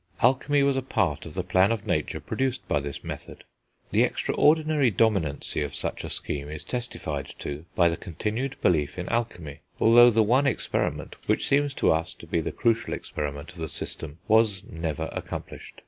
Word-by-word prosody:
Alchemy 140 Hz, +3 st, +4 dB
was 140 Hz, -1 st, +3 dB
a 135 Hz, -, +1 dB
part 80 Hz, -, -1 dB
of 80 Hz, -, -9 dB
the 95 Hz, -, -1 dB
plan 95 Hz, +3 st, +3 dB
of 115 Hz, -3 st, -2 dB
nature -, -, -1 dB
produced 130 Hz, -1 st, -2 dB
by 75 Hz, -, +2 dB
this 70 Hz, 0 st, -6 dB
method. -, -, -8 dB, 0.5 s
The -, -, +3 dB
extraordinary 155 Hz, -3 st, +3 dB
dominancy 95 Hz, -10 st, +1 dB
of 70 Hz, -, -5 dB
such -, -, -3 dB
a -, -, -5 dB
scheme 70 Hz, 0 st, -4 dB
is 75 Hz, 0 st, -6 dB
testified 80 Hz, -, -4 dB
to 75 Hz, +3 st, -6 dB
by 85 Hz, -, +5 dB
the 85 Hz, -1 st, 0 dB
continued 110 Hz, -, -3 dB
belief 75 Hz, -4 st, +2 dB
in 90 Hz, 0 st, -4 dB
alchemy, 90 Hz, -11 st, -3 dB, 0.2 s
although 120 Hz, +2 st, +8 dB
the 110 Hz, -1 st, +4 dB
one 130 Hz, +6 st, +3 dB
experiment, 125 Hz, -, -1 dB
which -, -, +1 dB
seems 140 Hz, 0 st, +2 dB
to -, -, +3 dB
us 80 Hz, +3 st, -1 dB
to -, -, -12 dB
be 85 Hz, 0 st, 0 dB
the -, -, -3 dB
crucial 115 Hz, 0 st, +1 dB
experiment 75 Hz, +2 st, -5 dB
of 90 Hz, -, -16 dB
the 80 Hz, -1 st, -3 dB
system, 75 Hz, -1 st, -4 dB
was 110 Hz, -3 st, +3 dB
never 80 Hz, -3 st, -3 dB
accomplished. -, -, -7 dB
95 Hz, 180 wpm, -26 LUFS, 80-120 Hz, 0.5 s, although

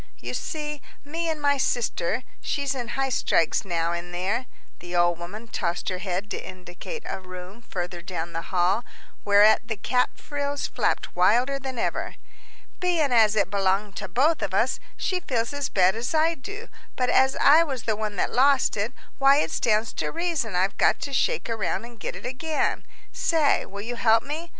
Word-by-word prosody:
"You -, -, -6 dB
see, 300 Hz, -2 st, -4 dB, 0.2 s
me 330 Hz, +3 st, -2 dB
and 315 Hz, -1 st, -2 dB
my 285 Hz, -1 st, +2 dB
sister 235 Hz, -3 st, 0 dB, 0.2 s
she's 280 Hz, -2 st, -1 dB
in 245 Hz, -3 st, -4 dB
highstrikes 255 Hz, -9 st, +1 dB
now 170 Hz, -3 st, -1 dB
in 175 Hz, +1 st, -4 dB
there." 200 Hz, +8 st, -1 dB, 0.3 s
The 175 Hz, 0 st, -7 dB
old 175 Hz, -1 st, +3 dB
woman 205 Hz, +7 st, -8 dB
tossed 175 Hz, -5 st, -2 dB
her 185 Hz, -1 st, -3 dB
head 190 Hz, +2 st, -3 dB
to -, -, -4 dB
indicate 185 Hz, -, -8 dB
a -, -, -4 dB
room 185 Hz, +4 st, -10 dB
further 180 Hz, -6 st, -5 dB
down 170 Hz, -2 st, -5 dB
the 165 Hz, -, -2 dB
hall, 185 Hz, +5 st, +2 dB, 0.4 s
whereat 210 Hz, +2 st, +5 dB
the 220 Hz, -3 st, -3 dB
cap 250 Hz, +5 st, 0 dB
frills 285 Hz, -1 st, -3 dB
flapped -, -, -1 dB
wilder 245 Hz, +10 st, +3 dB
than 265 Hz, -2 st, -6 dB
ever. -, -, -2 dB, 0.6 s
"Bein' 340 Hz, -6 st, +1 dB
as 220 Hz, -3 st, +5 dB
it 200 Hz, -3 st, +1 dB
belonged 195 Hz, 0 st, +1 dB
to -, -, -4 dB
both 300 Hz, -, +2 dB
of 190 Hz, -, -2 dB
us, 230 Hz, +6 st, +2 dB, 0.2 s
she 370 Hz, -1 st, -1 dB
feels 240 Hz, -6 st, -2 dB
as 285 Hz, -1 st, -2 dB
bad 185 Hz, 0 st, +3 dB
as 240 Hz, +7 st, -2 dB
I 320 Hz, +2 st, +4 dB
do, 405 Hz, +7 st, -8 dB, 0.3 s
but 250 Hz, -1 st, +1 dB
as 265 Hz, 0 st, +4 dB
I 310 Hz, +4 st, +6 dB
was 265 Hz, -7 st, -4 dB
the 220 Hz, -1 st, 0 dB
one 210 Hz, -1 st, -3 dB
that -, -, -1 dB
lost 275 Hz, +2 st, +4 dB
it, 215 Hz, +4 st, -2 dB, 0.3 s
why 275 Hz, 0 st, +6 dB
it 300 Hz, -, +1 dB
stands 220 Hz, 0 st, +1 dB
to -, -, -2 dB
reason 330 Hz, -, -1 dB
I've 190 Hz, +2 st, 0 dB
got -, -, +4 dB
to 280 Hz, -, -4 dB
shake 485 Hz, -, +1 dB
around 230 Hz, 0 st, -2 dB
and 235 Hz, -1 st, -13 dB
get -, -, -4 dB
it -, -, -9 dB
again. 300 Hz, +5 st, -1 dB, 0.2 s
Say, 315 Hz, -4 st, +2 dB
will 200 Hz, +1 st, -7 dB
you 240 Hz, +2 st, -5 dB
help 225 Hz, 0 st, +4 dB
me? 315 Hz, +4 st, -5 dB
230 Hz, 190 wpm, -25 LUFS, 190-280 Hz, 0.6 s, I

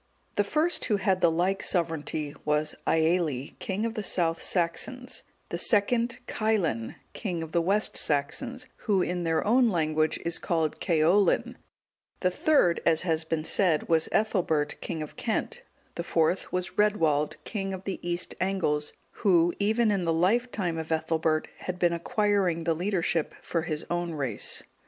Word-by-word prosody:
The 205 Hz, -, +2 dB
first 310 Hz, +11 st, 0 dB
who 210 Hz, -, +1 dB
had 190 Hz, -2 st, +1 dB
the 170 Hz, -, +5 dB
like 180 Hz, +4 st, 0 dB
sovereignty 160 Hz, -4 st, -1 dB
was 150 Hz, 0 st, 0 dB
Aelli, 160 Hz, -5 st, +1 dB
king 200 Hz, +4 st, -2 dB
of 230 Hz, -, -2 dB
the 220 Hz, -, -3 dB
South 170 Hz, -4 st, +1 dB
Saxons; 250 Hz, +9 st, -1 dB, 0.3 s
the -, -, -3 dB
second, 235 Hz, +2 st, +2 dB
Caelin, 190 Hz, -, -1 dB, 0.2 s
king 175 Hz, -7 st, -3 dB
of 160 Hz, -, -8 dB
the 170 Hz, -, +2 dB
West 200 Hz, +5 st, +1 dB
Saxons, 240 Hz, -, -1 dB, 0.2 s
who, 195 Hz, -4 st, +3 dB
in 180 Hz, -1 st, -2 dB
their 165 Hz, -1 st, +1 dB
own 240 Hz, +3 st, +4 dB
language, 155 Hz, -3 st, +1 dB
is 170 Hz, 0 st, -1 dB
called 160 Hz, -3 st, -1 dB
Ceaulin; 175 Hz, +3 st, +2 dB, 0.7 s
the 180 Hz, -, +2 dB
third, 180 Hz, -, +3 dB
as 160 Hz, 0 st, +2 dB
has 165 Hz, -3 st, +1 dB
been 160 Hz, -1 st, -2 dB
said, 170 Hz, -5 st, +2 dB
was 160 Hz, -1 st, +3 dB
Ethelbert, 180 Hz, -9 st, 0 dB
king 160 Hz, -2 st, -3 dB
of 150 Hz, -, -11 dB
Kent; -, -, -2 dB, 0.3 s
the 170 Hz, -, -4 dB
fourth 170 Hz, +2 st, +1 dB
was 180 Hz, +2 st, -3 dB
Redwald, 160 Hz, -8 st, +2 dB
king 195 Hz, -3 st, -3 dB
of 190 Hz, -1 st, -6 dB
the 195 Hz, -, -4 dB
East 175 Hz, 0 st, -2 dB
Angles, 170 Hz, -6 st, 0 dB, 0.3 s
who, 175 Hz, -5 st, +4 dB
even 220 Hz, +2 st, +2 dB
in 195 Hz, -3 st, 0 dB
the 165 Hz, -, +2 dB
life 200 Hz, +10 st, +2 dB
time 175 Hz, -5 st, -2 dB
of 160 Hz, 0 st, -6 dB
Ethelbert, 160 Hz, 0 st, 0 dB
had 180 Hz, -1 st, -4 dB
been 175 Hz, -1 st, +2 dB
acquiring 185 Hz, -1 st, +1 dB
the 165 Hz, 0 st, +2 dB
leadership 175 Hz, -2 st, -1 dB
for 165 Hz, -, -2 dB
his 155 Hz, -2 st, -2 dB
own 175 Hz, -1 st, -1 dB
race. 135 Hz, -8 st, -1 dB
175 Hz, 160 wpm, -27 LUFS, 160-200 Hz, 0.7 s, the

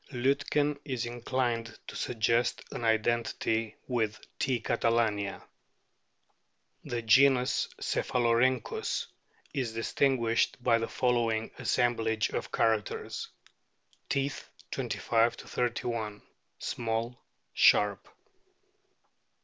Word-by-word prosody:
Liitken 140 Hz, +3 st, +1 dB
is 130 Hz, -5 st, -3 dB
inclined 120 Hz, -1 st, -2 dB
to -, -, -9 dB
suggest 115 Hz, +1 st, +1 dB
an -, -, -5 dB
identity 115 Hz, 0 st, +1 dB
with 110 Hz, -4 st, -1 dB, 0.2 s
T. 130 Hz, -2 st, +1 dB
catalania. 115 Hz, -3 st, 0 dB, 1.4 s
The 120 Hz, -1 st, -3 dB
genus 130 Hz, +2 st, +4 dB
CEPHALORHYNCHUS 120 Hz, 0 st, +1 dB, 0.5 s
is 125 Hz, -5 st, -2 dB
distinguished 115 Hz, 0 st, +1 dB
by 115 Hz, -1 st, +4 dB
the 115 Hz, -, -2 dB
following 115 Hz, -3 st, 0 dB
assemblage 115 Hz, -3 st, +1 dB
of -, -, -4 dB
characters: 110 Hz, -3 st, -1 dB, 0.8 s
Teeth, 140 Hz, 0 st, -2 dB, 0.2 s
25 115 Hz, -1 st, +1 dB
31, 115 Hz, -4 st, -3 dB, 0.3 s
small, 115 Hz, +1 st, -3 dB, 0.3 s
sharp. 105 Hz, -2 st, +4 dB
115 Hz, 80 wpm, -30 LUFS, 115-125 Hz, 1.4 s, genus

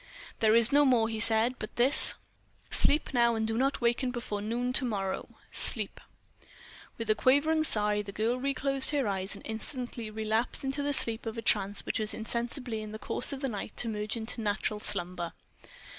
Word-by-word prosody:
"There 220 Hz, 0 st, +3 dB
is 235 Hz, 0 st, +7 dB
no 290 Hz, +1 st, +5 dB
more," 245 Hz, -5 st, +3 dB
he 220 Hz, -1 st, -5 dB
said, 225 Hz, +3 st, +2 dB
"but 215 Hz, -, -8 dB
this: 255 Hz, +4 st, +8 dB, 0.6 s
Sleep 295 Hz, -1 st, +4 dB
now, 235 Hz, -1 st, +2 dB
and 220 Hz, 0 st, -2 dB
do 225 Hz, -, -2 dB
not 270 Hz, +3 st, -1 dB
waken 240 Hz, +2 st, 0 dB
before 235 Hz, -4 st, -5 dB
noon 240 Hz, +4 st, -3 dB
to 265 Hz, -, -1 dB
morrow—sleep!" 200 Hz, -6 st, -3 dB, 1.0 s
With 230 Hz, -, -6 dB
a -, -, +5 dB
quavering 285 Hz, +7 st, +2 dB
sigh, 210 Hz, -6 st, 0 dB
the 200 Hz, -1 st, -9 dB
girl 225 Hz, +5 st, -2 dB
reclosed 275 Hz, 0 st, +1 dB
her 285 Hz, -5 st, -1 dB
eyes 190 Hz, -1 st, -2 dB
and -, -, -13 dB
instantly 235 Hz, 0 st, -5 dB
relapsed 220 Hz, +4 st, -1 dB
into 270 Hz, +2 st, -3 dB
the 290 Hz, 0 st, -1 dB
sleep 230 Hz, -3 st, 0 dB
of 225 Hz, -, -5 dB
trance 200 Hz, +1 st, 0 dB
which -, -, -2 dB
was 215 Hz, -1 st, -2 dB
insensibly 235 Hz, +1 st, -4 dB
in 215 Hz, 0 st, -9 dB
the -, -, -6 dB
course 215 Hz, -, -1 dB
of 275 Hz, -1 st, -6 dB
the 270 Hz, -, -2 dB
night 210 Hz, -1 st, -7 dB
to 240 Hz, -, -2 dB
merge 215 Hz, +1 st, -4 dB
into 225 Hz, +1 st, -5 dB
natural 210 Hz, 0 st, -2 dB
slumber. 180 Hz, -4 st, -3 dB
230 Hz, 185 wpm, -29 LUFS, 215-255 Hz, 1.0 s, this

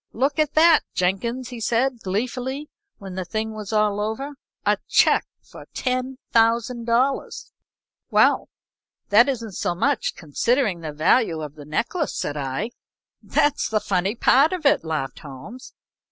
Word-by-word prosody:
"Look 275 Hz, +5 st, 0 dB
at 305 Hz, -1 st, +1 dB
that, 325 Hz, 0 st, +7 dB, 0.2 s
Jenkins!" 235 Hz, +7 st, -1 dB
He 245 Hz, -2 st, -7 dB
said, 240 Hz, +3 st, 0 dB
gleefully, 250 Hz, +8 st, -3 dB, 0.3 s
when 195 Hz, -2 st, -9 dB
the 185 Hz, 0 st, -3 dB
thing 220 Hz, +4 st, -3 dB
was 215 Hz, -1 st, -7 dB
all 210 Hz, -1 st, +2 dB
over. 220 Hz, +7 st, -3 dB, 0.3 s
"A -, -, +2 dB
check -, -, +4 dB, 0.2 s
for -, -, -13 dB
$10,000." 245 Hz, 0 st, 0 dB, 0.6 s
"Well -, -, +3 dB, 0.6 s
that 235 Hz, +6 st, +6 dB
isn't 230 Hz, -5 st, -3 dB
so 175 Hz, -1 st, -2 dB
much, 275 Hz, +6 st, 0 dB
considering 195 Hz, -, 0 dB
the 155 Hz, -2 st, -5 dB
value 160 Hz, +2 st, +2 dB
of 150 Hz, -2 st, -7 dB
the 150 Hz, -1 st, -12 dB
necklace," 235 Hz, -, -2 dB
said 145 Hz, -, -3 dB
I. 140 Hz, -, -3 dB, 0.5 s
"That's 290 Hz, -1 st, +1 dB
the 215 Hz, -, +1 dB
funny 195 Hz, +1 st, -1 dB
part 275 Hz, +7 st, +4 dB
of 350 Hz, -4 st, -4 dB
it," 280 Hz, -, +4 dB
laughed 155 Hz, -4 st, -3 dB
Holmes. 150 Hz, -, -10 dB
230 Hz, 140 wpm, -23 LUFS, 185-260 Hz, 0.6 s, that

